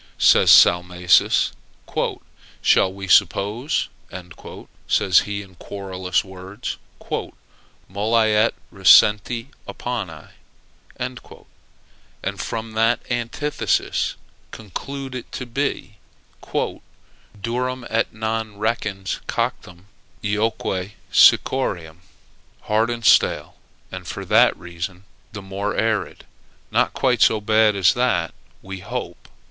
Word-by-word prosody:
says - - +5
Salmasius. 90 0 +5 1.1
"Shall 95 - +4
we 100 0 -8
suppose," 105 - +2 1.0
says 95 -3 +4
he, 100 0 -4
in 95 -1 -17
querulous 95 0 -3
words, 95 +4 -7 1.1
"molli 110 +3 +1
et 110 +2 +3 0.2
recenti 105 +5 +5 0.2
opponi," 100 -11 -5 0.7
and - - -4 1.2
from 115 0 -4
that 115 +2 +2
antithesis 120 +5 -1 0.3
conclude 135 +6 -7
it 125 -2 -7
to 125 - -5
be, 120 -4 -3 0.4
"durum 120 +4 -5
et 115 +1 0
non 110 -1 -3
recens 105 -3 -2
coctum, 90 +1 -3 0.4
eoque 105 -2 -1 0.2
sicciorem?" 85 -12 +3 0.6
Hard 110 +2 +1
and 120 -1 -4
stale, - - +3 0.4
and - - -8
for - - -6
that - - +4
reason 90 +2 -7 0.3
the 100 -2 -7
more 100 +2 -3
arid! 110 -1 -1 0.5
Not - - +2
quite 125 -3 +1
so 110 - +5
bad 110 0 +3
as 95 -3 +4
that, 120 -10 0 0.3
we 95 0 -7
hope. - - -7
105 Hz, 95 wpm, -22 LUFS, 95-115 Hz, 1.2 s, says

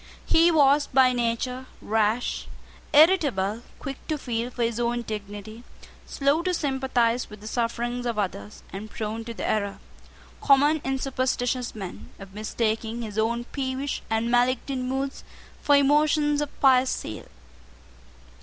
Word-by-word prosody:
He 330 +1 +5
was 290 -2 +4
by 260 -1 +4
nature 245 +2 -2
rash, 220 +2 0 0.4
irritable, 285 - +4 0.2
quick 275 -2 -6
to 310 - -1
feel 240 -3 -3
for 245 -1 -3
his 230 0 -1
own 240 0 0
dignity, 210 +1 -7 0.4
slow 280 +3 +1
to 365 +1 0
sympathise 260 -5 0
with 210 -1 -11
the 210 - -13
sufferings 240 +2 -2
of 235 -2 -2
others, 145 - -4
and 205 +3 -6
prone 220 +1 -4
to 235 - -6
the - - -3
error, 200 -2 -1 0.6
common 290 +2 +4
in 270 0 -1
superstitious 255 -2 -1
men, 190 -4 -8
of 195 -1 -12
mistaking 220 +2 -2
his 215 -1 -4
own 235 +2 0
peevish 270 0 -3
and 225 +1 0
malignant 255 +1 +1
moods 270 +1 -3 0.4
for 290 - +4
emotions 295 +1 +3
of 295 - -5
pious 260 -1 +5
zeal. 110 - -5
245 Hz, 140 wpm, -25 LUFS, 220-275 Hz, 0.6 s, He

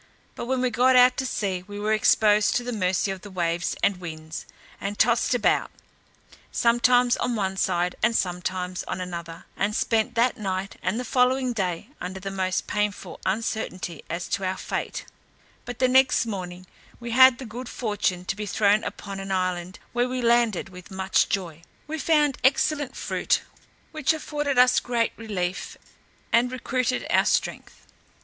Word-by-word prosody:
But - - -6
when 260 0 0
we 255 -1 +1
got 250 +3 +4
out 250 0 +7
to 265 - -1
sea, 190 -6 -2
we 205 0 -7
were 215 +1 +1
exposed 215 -1 +4
to 245 - +1
the 245 0 -4
mercy 190 -1 0
of 190 -1 -6
the 205 - -10
waves 175 -2 -1
and 200 -2 +3
winds, 160 -2 -7 0.3
and 200 +1 -4
tossed 235 +2 +3
about, 240 - +2 0.8
sometimes 240 +1 +3
on 245 -1 -1
one 195 -3 -1
side, 180 -1 0
and 230 +1 +2
sometimes 180 -1 -2
on - - -4
another, 170 -2 -6
and 210 +2 -1
spent 230 +2 +1
that 240 +2 +2
night 195 -1 -3
and 200 +6 -1
the 250 - -4
following 255 +1 +2
day 190 0 -2
under 185 +1 -5
the 195 +1 -5
most 185 -1 -1
painful 205 -4 -2
uncertainty 190 -5 -3
as 170 +2 -3
to 195 - -1
our 185 0 -1
fate; - - -4 0.6
but 245 -1 -7
next 260 -1 +4
morning 185 -4 -6 0.3
we 235 -1 -6
had 260 0 +7
the 260 - -8
good 240 +3 -7
fortune 205 -6 -2
to 195 - -2
be 210 0 -5
thrown 205 +1 +3
upon 195 -1 -6
an 195 0 -5
island, 185 0 -2 0.2
where 245 +1 +1
we 255 0 -2
landed 235 -5 +2
with 180 -1 -12
much 190 0 +1
joy. 170 -5 -3 0.2
We 315 +1 -5
found 295 -2 +2
excellent 275 +1 +2
fruit, - - 0 0.5
which 310 0 +1
afforded 295 -3 -2
us 250 0 +6
great 235 -2 0
relief, 190 -5 -4 0.6
and 245 +2 +4
recruited 255 0 -1
our - - +4
strength. - - -2
210 Hz, 170 wpm, -25 LUFS, 185-245 Hz, 0.8 s, out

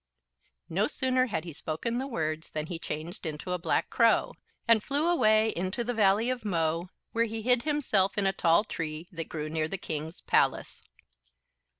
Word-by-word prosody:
"_ - - -57 0.6
No 195 +6 +1
sooner 255 -1 +1
had 160 -9 -2
he 170 -2 -7
spoken 165 +11 -3
the 265 - -3
words 160 - -3
than 155 -1 -3
he 165 0 -5
changed 160 +4 -6
into 155 +2 -5
a 180 - -1
Black 165 - 0
Crow, - - +3 0.3
and 230 -2 +5
flew 290 +4 0
away 220 -10 +4
into 190 +4 -2
the 245 +1 -2
Valley 215 +2 +3
of 250 -3 -4
Mo, 170 -3 0 0.2
where 230 0 +2
he 225 -1 -5
hid 245 0 +4
himself 245 -11 +1
in 200 - +1
a 195 - +2
tall 170 +2 +4
tree 160 -5 -5
that 165 -3 -6
grew 155 -1 -4
near 155 0 -1
the 195 - -3
King's 160 -1 -5
palace. - - +1
190 Hz, 190 wpm, -29 LUFS, 160-230 Hz, 0.6 s, and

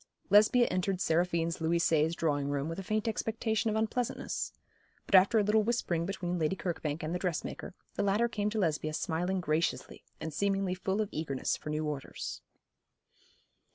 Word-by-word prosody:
Lesbia 215 +4 +6
entered 185 0 0
Seraphine's 170 -1 +1
Louis 165 +1 +2
seize 160 -1 +2
drawing 145 -4 0
room 145 0 -1
with 165 +3 -4
a - - -4
faint 215 +3 -1
expectation 225 0 0
of 215 - -1
unpleasantness; 220 +2 -1 0.5
but - - -9
after 195 +4 +7
a 210 - +4
little 210 +2 +3
whispering 185 -7 0
between 180 -2 -2
Lady 160 +4 +1
Kirkbank 160 -5 -3
and 155 +2 -2
the 180 - -1
dressmaker, 180 0 -3 0.2
the - - -2
latter 205 +4 +2
came 210 -3 -1
to 220 - -4
Lesbia 155 -5 0
smiling 175 +4 -1
graciously, 160 0 -1 0.2
and 160 - -5
seemingly 195 +1 0
full 190 +3 -1
of 210 - -2
eagerness 150 -4 -1
for - - -8
new 155 +1 -1
orders. 145 -3 -5
180 Hz, 170 wpm, -31 LUFS, 160-210 Hz, 0.5 s, after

